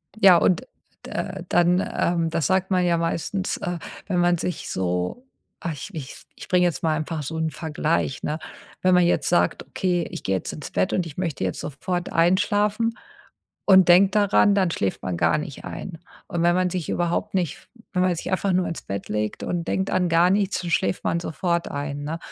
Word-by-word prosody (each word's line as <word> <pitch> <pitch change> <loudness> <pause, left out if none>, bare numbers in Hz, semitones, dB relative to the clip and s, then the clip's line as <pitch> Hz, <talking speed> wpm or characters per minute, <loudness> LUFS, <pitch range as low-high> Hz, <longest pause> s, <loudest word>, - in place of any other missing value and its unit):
Ja, 195 -5 +7
und, 180 - +2 0.4
äh, 190 -2 -4
dann, 175 +1 +4 0.2
ähm 170 -1 +1
da 165 - -1
sagt 190 +6 +1
man 180 -1 +3
ja 170 -1 +2
meistens, 170 +3 -2
äh, 175 0 -3 0.3
wenn 180 -3 0
man 175 0 +3
sich 175 0 -4
so 90 - -2 0.4
ach, 170 - -3
ich 140 - -7
ich 145 -5 -7 0.2
ich - - -10
bringe 180 -2 +3
jetzt 170 -6 -1
mal 160 -1 +2
einfach 155 0 -3
so 160 +4 -5
'nen 160 0 0
Vergleich, 155 -2 -1
ne? 150 +1 -1 0.5
Wenn 185 0 +4
man 180 - +5
jetzt 175 - +1
sagt: 175 - +1
„Okay, 180 -3 -1
ich - - -6
gehe 95 - 0
jetzt 95 - -4
ins 150 - -7
Bett 185 - 0
und 180 - +1
ich 150 - -11
möchte 165 - -2
jetzt 90 - -2
sofort 175 +5 -3
einschlafen“ 205 +6 +2 0.7
und 190 -2 +7
denkt 190 +3 +6
daran, 205 -1 +4
dann 190 -3 +2
schläft 100 - -2
man 90 -2 -2
gar - - +3
nicht 145 -2 -7
ein. 175 -3 -6 0.3
Und 170 - -1
wenn 175 0 +4
man 180 0 +1
sich 175 -3 -3
überhaupt 175 +2 -1
nicht 180 -4 -2 0.2
wenn 180 - 0
man 185 -1 +2
sich 165 - -5
einfach 190 +1 +1
nur 180 0 +2
ins 165 - -5
Bett 100 0 -5
legt 105 0 -2
und 175 -1 -2
denkt 190 0 0
an 180 -1 +1
gar 170 +2 +4
nichts, 200 0 +1
dann 175 - -4
schläft 180 +2 0
man 170 - 0
sofort 170 +1 -1
ein, 145 0 -4
ne? 160 +3 -3
175 Hz, 205 wpm, -24 LUFS, 160-185 Hz, 0.7 s, Ja